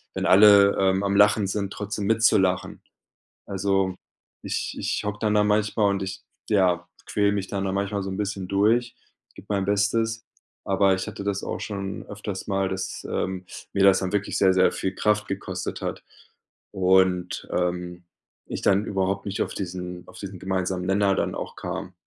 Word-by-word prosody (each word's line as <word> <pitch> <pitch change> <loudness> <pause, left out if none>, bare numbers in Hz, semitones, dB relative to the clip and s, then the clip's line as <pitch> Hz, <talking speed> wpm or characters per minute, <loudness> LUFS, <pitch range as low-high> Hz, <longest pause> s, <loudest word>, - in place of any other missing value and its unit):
wenn - - -2
alle, 100 0 +7
ähm, 95 0 +2
am 100 0 0
Lachen 105 0 +5
sind, 100 0 -2
trotzdem 105 0 -4
mit 115 +1 +2
zu 115 - +6
lachen. 95 -1 -1 0.7
Also 95 -1 0 0.5
ich - - -3
ich - - -2
hocke 105 0 -3
dann 105 -1 +1
da 105 0 +4
manchmal 105 0 +2
und 100 -1 -1
ich, 95 -1 -5 0.3
ja, 90 -4 +2 0.2
quäle 100 -1 +2
mich 100 -2 -2
dann 100 -1 -2
da 95 - -1
manchmal 100 +1 -1
so 95 - -4
'n 95 - -4
bisschen 100 -2 -3
durch, 110 +5 +2 0.4
gebe - - -13
mein 100 -2 +1
Bestes, 110 +3 0 0.4
aber 95 0 +3
ich 95 - -3
hatte - - -6
das 100 -1 -2
auch - - -4
schon 100 -2 -5
öfters 105 -2 -6
mal, 95 -1 0
dass, 95 0 -4
ähm, 95 0 -3 0.3
mir 100 -1 +2
das 95 -1 +6
dann 95 0 -3
wirklich 105 -1 -1
sehr, 95 -1 +5
sehr 95 0 +4
viel 95 - -2
Kraft 105 +1 +1
gekostet 100 0 -4
hat - - -4 0.7
und, 95 -1 +2
ähm, 90 0 -2 0.4
ich - - -5
dann 100 +1 +3
überhaupt 95 0 -1
nicht 100 0 -3
auf - - -4
diesen 90 -1 -6
auf - - -13
diesen 100 -2 -7
gemeinsamen 95 -1 -2
Nenner 100 +1 +2
dann - - -1
auch - - -5
kam. 95 - -5
100 Hz, 180 wpm, -25 LUFS, 95-105 Hz, 0.7 s, alle